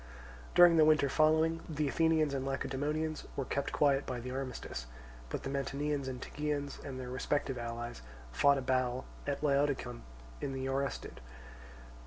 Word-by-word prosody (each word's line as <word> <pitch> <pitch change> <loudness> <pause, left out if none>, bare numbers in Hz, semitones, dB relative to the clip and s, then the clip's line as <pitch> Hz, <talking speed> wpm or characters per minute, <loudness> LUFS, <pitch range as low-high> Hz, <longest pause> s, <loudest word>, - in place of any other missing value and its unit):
During 175 -1 +8
the 155 - +7
winter 155 -2 +5
following, 160 +3 +3
the 150 -1 0
Athenians 160 -1 +2
and 135 -1 -1
Lacedaemonians 145 +4 -2
were 135 - -2
kept 140 +2 -2
quiet 140 -1 +2
by 125 -1 -3
the 125 +2 -6
armistice; 130 - -5 0.4
but - - -4
the - - -3
Mantineans 140 0 -1
and 130 -1 -4
Tegeans, 145 0 -3
and 135 -2 -6
their 125 -1 -6
respective 135 0 -1
allies, 120 - -5 0.3
fought 140 - +4
a 135 - -2
battle 130 -1 0 0.2
at 140 +1 -2
Laodicium, 140 -4 +1 0.4
in 135 - -2
the 130 0 -3
Oresthid. 135 +1 -3
140 Hz, 155 wpm, -33 LUFS, 130-150 Hz, 0.4 s, During